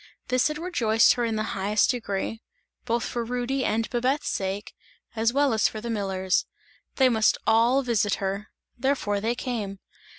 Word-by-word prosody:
This 255 0 +3
had 305 0 -3
rejoiced 240 -11 +3
her 245 - -2
in 225 -1 -1
the 215 - -1
highest 205 +4 +2
degree, 225 -2 -3 0.4
both 235 0 0
for 240 -1 -3
Rudy 250 +3 -2
and 220 0 0
Babette's 255 +4 0
sake, 195 +1 -3 0.4
as 225 +1 +2
well 280 -1 +2
as 220 - +3
for 215 - -6
the 235 +2 -4
miller's; 190 -3 0 0.5
they 265 - +5
must 220 -3 +3
all 235 +5 +4
visit 215 -5 +1
her 195 +2 -3 0.3
therefore 240 -6 0
they 230 +3 0
came. 225 -6 -4
230 Hz, 165 wpm, -26 LUFS, 210-250 Hz, 0.5 s, they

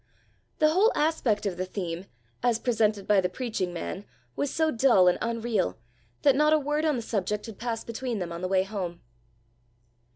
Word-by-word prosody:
The 310 - +4
whole 390 +9 +4
aspect 265 -10 +1
of 190 -3 -2
the 185 - -2
thing, 180 -1 -5 0.3
as 240 -2 +2
presented 215 -4 +1
by 205 -2 +4
the 180 - 0
preaching 195 -4 -3
man, 175 +3 -5 0.3
was 285 - -1
so 320 -1 +1
dull 230 -7 +5
and 180 - +3
unreal, 230 - -1 0.5
that 280 -2 +5
not 300 +2 +4
a - - +6
word 295 +2 -1
on 305 -2 +2
the 235 - -3
subject 210 -1 -2
had 225 -4 -10
passed 230 -1 -3
between 235 0 -3
them 180 -3 -4
on 170 +1 -6
the 185 - -1
way 190 0 +2
home. 190 -4 -5
220 Hz, 190 wpm, -27 LUFS, 190-260 Hz, 0.5 s, a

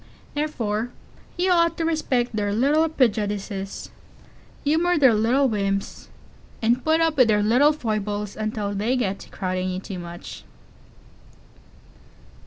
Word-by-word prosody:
Therefore 240 -7 -2 0.5
you 365 +1 +2
ought 335 -1 +3
to 330 - -1
respect 255 -8 0
their 205 -1 0
little 300 +7 +3
prejudices, 205 -7 -1 0.7
and - - -26
humor 335 +4 +2
their 265 -5 +6
little 240 +6 +3
whims, 195 -3 -2 0.5
and 240 +2 +1
put 320 +1 +2
up 325 -2 +1
with 255 -3 +6
their 210 -2 +3
little 250 +8 +5
foibles 210 -6 -3
until 215 -1 -3
they 215 +6 0
get 200 -5 -1
to - - -12
crowding 185 -1 -2
you 185 0 -3
too 190 -1 -7
much. 175 0 -9
225 Hz, 135 wpm, -23 LUFS, 205-290 Hz, 0.7 s, their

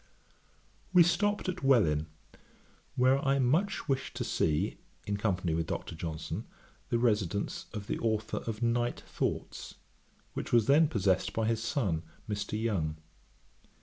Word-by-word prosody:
We 180 -2 +9
stopped 205 +5 +1
at 185 - -3
Welwyn, 85 - +4 0.9
where 130 +2 +4
I 135 0 +3
wished 155 +12 +1
much 135 -2 -1
to - - -2
see, 75 -2 0 0.3
in 100 0 -1
company 95 -5 0
with 80 0 -1
Dr. - - -4
Johnson, 80 -1 -5 0.4
the 120 - +2
residence 105 -4 0
of 105 -3 -5
the - - -2
authour 110 -1 -1
of 115 +1 -3
Night 120 +1 +1
Thoughts, - - -3 0.6
which - - -4
was 115 -3 +5
then 150 +4 +6
possessed 100 - +1
by 110 - 0
his 110 0 +1
son, 115 - 0 0.3
Mr. 105 0 -2
Young. 85 -9 -1
115 Hz, 140 wpm, -31 LUFS, 95-135 Hz, 0.9 s, We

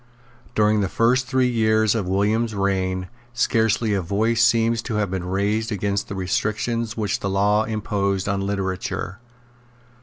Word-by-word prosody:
During 105 0 +3
the 95 - -1
first 125 +4 +2
three 130 0 +2
years 110 -2 +2
of 105 -5 -2
William's 105 +4 +1
reign 95 -2 -1 0.3
scarcely 115 -3 +1
a 100 - +1
voice 110 +6 +1
seems 115 -1 +3
to 110 - -4
have 105 -3 0
been 95 -2 -2
raised 105 +4 0
against 100 0 -1
the 100 - -6
restrictions 110 +4 -2
which 105 -3 -1
the 100 - -2
law 105 +2 +2
imposed 100 -3 -1
on 100 -1 0
literature. 95 0 -3
105 Hz, 150 wpm, -22 LUFS, 100-115 Hz, 0.3 s, During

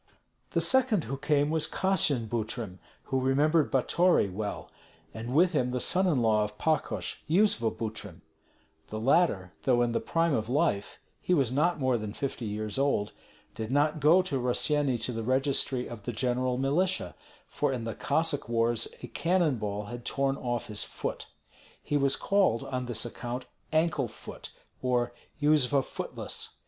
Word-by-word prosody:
The - - +2
second 255 - +4
who 130 +4 -4
came 145 +1 +1
was 160 -1 +3
Kassyan 155 -11 +2
Butrym, 110 -4 -4 0.2
who 130 -1 -1
remembered 145 +4 +2
Batory 170 - +3
well, 105 +1 -5 0.4
and 115 +3 -5
with 175 +3 +5
him 130 -7 +1
the 125 0 -2
son 185 +8 +3
in 140 -9 +2
law 110 -1 +3
of 105 0 -6
Pakosh, 160 -1 -1
Yuzva 170 - +3
Butrym; 105 -6 -6 0.7
the 110 - -5
latter, 115 - +2
though 120 -2 +3
in 120 - 0
the - - 0
prime 165 -1 +1
of 110 -3 -1
life, 135 -7 0 0.2
he 180 - +2
was 135 -6 +2
not 150 +6 +1
more 130 -3 +1
than 105 -1 -5
fifty 130 -2 -4
years 105 +2 -3
old, 135 -7 +1 0.4
did 110 -1 -5
not 150 +3 +2
go 165 +6 +5
to 145 -8 -2
Rossyeni 135 +2 +1
to - - -1
the 115 -1 -3
registry 130 +1 +1
of 115 -3 -8
the 120 - -4
general 125 +1 0
militia, 170 +8 0 0.3
for 145 - -1
in 125 -3 -3
the 115 -1 -3
Cossack 160 -6 0
wars 115 0 +2 0.2
a - - -5
cannon 165 -4 +1
ball 105 0 -3
had 120 +3 -7
torn 135 +2 0
off 120 -3 -3
his 105 -1 -4
foot. - - -5 0.6
He 145 - -2
was 140 -1 +3
called 195 - +2
on 125 -1 -4
this 120 -1 0
account 120 +2 -5 0.3
Ankle 155 -4 +1
foot, 110 - -10 0.3
or 125 -1 0 0.3
Yuzva 145 -2 +3
Footless. - - -6
130 Hz, 165 wpm, -29 LUFS, 115-150 Hz, 0.7 s, with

